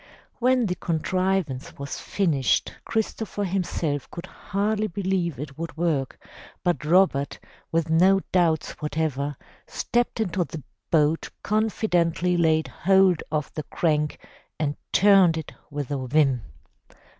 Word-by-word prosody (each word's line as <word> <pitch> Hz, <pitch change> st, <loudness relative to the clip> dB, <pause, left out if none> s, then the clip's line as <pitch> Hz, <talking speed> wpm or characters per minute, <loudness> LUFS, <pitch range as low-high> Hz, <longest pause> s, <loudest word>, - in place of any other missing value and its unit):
When 250 Hz, 0 st, +3 dB
the 180 Hz, -, 0 dB
contrivance 180 Hz, -4 st, -1 dB
was 140 Hz, 0 st, -5 dB
finished 155 Hz, -10 st, +1 dB
Christopher 220 Hz, -2 st, -2 dB
himself 175 Hz, -7 st, -2 dB
could 170 Hz, -, -7 dB
hardly 210 Hz, +2 st, -1 dB
believe 185 Hz, -4 st, -1 dB
it 140 Hz, 0 st, -7 dB
would 165 Hz, 0 st, -5 dB
work, 155 Hz, -6 st, 0 dB, 0.5 s
but 175 Hz, -3 st, 0 dB
Robert, 155 Hz, -4 st, +3 dB, 0.3 s
with 165 Hz, 0 st, +1 dB
no 190 Hz, +4 st, +5 dB
doubts 170 Hz, -4 st, +2 dB
whatever, 145 Hz, -2 st, -2 dB, 0.3 s
stepped 240 Hz, -1 st, -1 dB
into 185 Hz, -4 st, 0 dB
the 160 Hz, -3 st, -8 dB, 0.3 s
boat, 155 Hz, 0 st, +2 dB
confidently 180 Hz, -5 st, +1 dB
laid 160 Hz, -2 st, +2 dB
hold 190 Hz, -2 st, +3 dB
of 150 Hz, -3 st, -2 dB
the 155 Hz, -, -3 dB
crank 150 Hz, -1 st, 0 dB, 0.4 s
and 145 Hz, -2 st, 0 dB, 0.2 s
turned 190 Hz, -4 st, +5 dB
it 160 Hz, -, -6 dB, 0.2 s
with 145 Hz, -2 st, -5 dB
a 130 Hz, -2 st, -2 dB
vim. 135 Hz, -3 st, +3 dB
170 Hz, 120 wpm, -25 LUFS, 150-190 Hz, 0.5 s, no